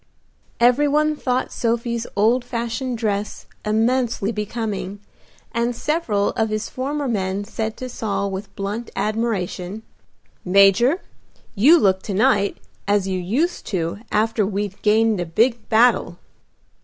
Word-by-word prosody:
Every 250 +5 +4
one 305 +1 +2
thought 255 -3 -1
Sophie's 235 0 -1
old 230 +5 +3
fashioned 240 +1 -3
dress 210 -2 -2 0.2
immensely 225 0 +1
becoming, 210 -2 -4 0.5
and 235 +1 -1
several 230 -10 0
of 220 -1 -1
his 215 0 -3
former 280 +2 -3
men 195 -3 -1
said 220 +1 -4
to 255 - -5
Saul 200 -5 -2
with 195 +1 -7
blunt 205 +4 -4
admiration, 215 -2 -2 0.6
"Major, 200 - +4 0.5
you 275 +12 +6
look 190 - +2
to 200 - -4
night 200 0 +2 0.3
as 200 -1 +2
you 190 -1 -1
used 260 - -1
to 170 -1 -2
after 220 +1 +1
we'd 200 0 -3
gained 220 -1 +3
a - - -2
big 230 +7 +1
battle." 225 -6 +3
220 Hz, 130 wpm, -21 LUFS, 200-240 Hz, 0.6 s, you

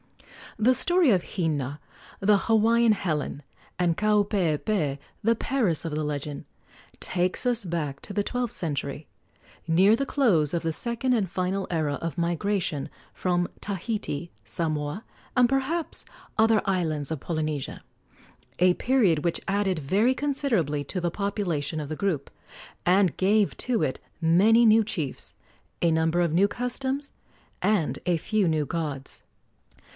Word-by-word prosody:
The 230 +4 +4
story 350 0 +4
of 185 -4 0
Hina, 150 -6 -1 0.4
the 205 +1 +4
Hawaiian 230 +1 +4
Helen, 155 -8 -2 0.4
and 175 -2 +2
Kaupeepee, 200 -6 +1 0.3
the 230 +2 +3
Paris 220 - 0
of 155 -2 -3
the 155 - -1
legend, 145 -1 -4 0.6
takes 180 +5 -1
us 240 -2 +1
back 155 -6 -3
to 205 - -8
the 205 - +1
twelfth 245 +1 -2
century, 145 -2 -4 0.6
near 190 +6 +5
the 275 - -1
close 180 - +2
of 170 - -1
the 165 -1 -1
second 235 +6 -1
and 205 -6 +1
final 190 +1 -2
era 155 -4 0
of 165 -3 -4
migration 170 -3 -1 0.2
from 175 -1 0
Tahiti, 195 -5 -3
Samoa, 150 - -3 0.3
and 250 -1 +6
perhaps 270 +6 -1 0.3
other 220 -1 +4
islands 160 -7 -1
of 160 - -2
Polynesia 155 -4 -3 0.8
a 180 0 +5
period 200 - +2
which 170 - 0
added 195 -3 +1
very 205 - +2
considerably 235 - 0
to 185 - -3
the 175 -1 -1
population 175 -7 -2
of 145 -2 -5
the 155 - -3
group, 185 -5 -1 0.6
and 185 -3 +4
gave 205 +2 +2
to 245 -4 0
it 130 - -1 0.2
many 200 +8 +5
new 220 0 +6
chiefs, 170 -10 -4 0.5
a 170 - +3
number 160 +1 +2
of 170 -3 +1
new 190 +4 +4
customs, 260 +5 -3 0.5
and 205 -7 +1
a 175 -2 +3
few 210 +3 0
new 155 -2 +1
gods. 145 -3 -4
180 Hz, 140 wpm, -26 LUFS, 155-220 Hz, 0.8 s, and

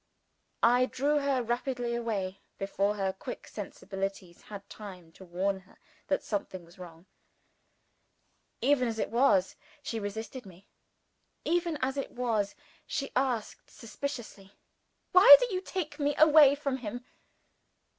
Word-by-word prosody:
I 245 +2 +5
drew 290 +4 +1
her 275 -3 0
rapidly 240 0 -2
away, 200 -5 -3 0.2
before 200 +1 -1
her 195 -2 -1
quick 245 +6 -8
sensibilities 195 -3 -6
had 200 -1 -10
time 185 -6 -11
to 190 - -15
warn 190 +2 -2
her 190 +1 -23 0.3
that 285 - 0
something 190 -4 -4
was 170 +2 -19
wrong. 170 -1 -12 1.6
Even 255 -1 +3
as 225 -1 -3
it - - -2
was, 230 -6 +3 0.3
she 230 -5 -3
resisted 220 +5 -6
me. 190 0 -16 0.8
Even 340 -2 0
as 265 +2 -1
it 275 - -3
was, 225 -5 -1 0.3
she 275 - -3
asked 250 -4 -2
suspiciously, 230 -5 -7 0.6
"Why 370 +7 +11
do - - -1
you 370 - -1
take 325 -6 -5
me 290 0 0
away 300 -2 +7
from 280 -2 -2
him?" 245 0 -7
230 Hz, 135 wpm, -29 LUFS, 195-275 Hz, 1.6 s, Why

